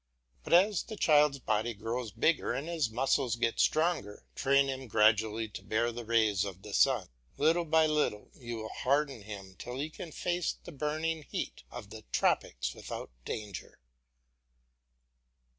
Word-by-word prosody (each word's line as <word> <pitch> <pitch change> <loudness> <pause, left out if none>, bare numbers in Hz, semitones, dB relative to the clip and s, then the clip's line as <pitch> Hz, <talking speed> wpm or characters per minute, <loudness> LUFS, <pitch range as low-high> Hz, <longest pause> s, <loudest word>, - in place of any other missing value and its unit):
But - - -2
as 195 +3 +5
the 220 - -8
child's 150 -6 +4
body 110 -2 -1
grows 115 +3 -3
bigger 155 +3 +1
and 135 +5 -3
his 165 -8 0
muscles 125 +1 +1
get 115 -1 0
stronger, 155 - +1
train 140 0 +3
him 135 -1 -4
gradually 110 +1 +3
to - - -8
bear 115 +2 0
the 120 +1 -6
rays 110 -4 +2
of 95 -2 -7
the 105 - -8
sun. 125 -9 +3 0.3
Little 165 +3 +3
by 160 0 +4
little 150 -9 0
you 120 -2 -7
will 110 -1 -5
harden 140 -2 0
him 100 -2 -9
till 125 +1 -6
he 150 +3 -3
can 165 +1 -8
face 175 +2 -1
the - - -12
burning 155 +2 -2
heat - - -4
of - - -9
the - - -8
tropics - - +1
without - - -7
danger. 105 -4 -6
125 Hz, 160 wpm, -31 LUFS, 110-155 Hz, 0.3 s, as